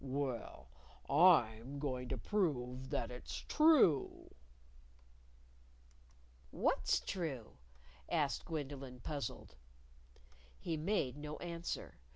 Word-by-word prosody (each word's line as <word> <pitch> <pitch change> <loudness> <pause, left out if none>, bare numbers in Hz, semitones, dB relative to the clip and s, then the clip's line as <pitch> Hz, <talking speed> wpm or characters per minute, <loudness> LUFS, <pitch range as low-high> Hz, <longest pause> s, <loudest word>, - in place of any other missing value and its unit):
Well, 135 -3 -3 0.4
I'm 140 -6 +4
going 130 -3 -3
to - - -2
prove 130 - -1
that 115 - -2
it's 125 - -7
true." 300 - +4 2.2
"What's - - +1
true?" 145 - -4 0.5
asked 150 -5 0
Gwendolyn, 140 -5 -5
puzzled. 140 - -5 1.0
He 165 - -2
made 155 -5 0
no 150 +1 -6
answer. 170 - -5
140 Hz, 85 wpm, -36 LUFS, 125-165 Hz, 2.2 s, I'm